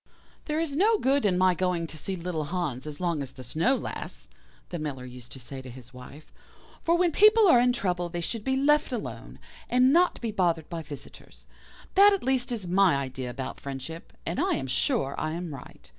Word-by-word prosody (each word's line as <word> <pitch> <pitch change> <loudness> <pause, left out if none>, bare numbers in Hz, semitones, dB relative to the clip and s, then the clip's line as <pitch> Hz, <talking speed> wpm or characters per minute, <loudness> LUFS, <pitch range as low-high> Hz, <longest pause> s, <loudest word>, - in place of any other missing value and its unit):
"'There 305 0 -1
is 320 -4 -2
no 430 +7 +4
good 275 - +2
in 180 -2 +1
my 185 0 +4
going 180 -1 0
to 160 - -8
see 190 +5 -4
little 170 -3 -3
Hans 155 -6 -3
as 150 -1 -6
long 170 -4 -1
as 135 -1 -6
the 130 - -10
snow 165 - +1
lasts,' - - -6 0.4
the 175 - -4
Miller 140 -4 -5
used 125 -1 -11
to 135 - -9
say 130 +2 -8
to 130 - -10
his 125 0 -12
wife, 125 +4 -12 0.5
'for 335 +1 +3
when 350 -1 +3
people 430 +4 +6
are 255 -9 +7
in 250 0 +4
trouble 180 -7 -1
they 175 - -4
should 205 +6 -3
be 265 +3 +1
left 295 +2 +3
alone, 240 -4 -6 0.3
and 255 +2 +4
not 355 +2 +3
be 230 -2 -3
bothered 170 -6 0
by 170 -1 -4
visitors. 150 -2 -12 0.5
That 405 +1 +7
at 395 - -2
least 255 -1 0
is 220 -6 -3
my 185 -2 +4
idea 130 -2 -4
about 130 +2 -6
friendship, 140 +4 -7
and 170 - -2
I - - +2
am 135 - -3
sure 135 +1 0
I 155 0 -2
am 170 -2 -5
right. 140 - -12
175 Hz, 215 wpm, -27 LUFS, -, 0.5 s, are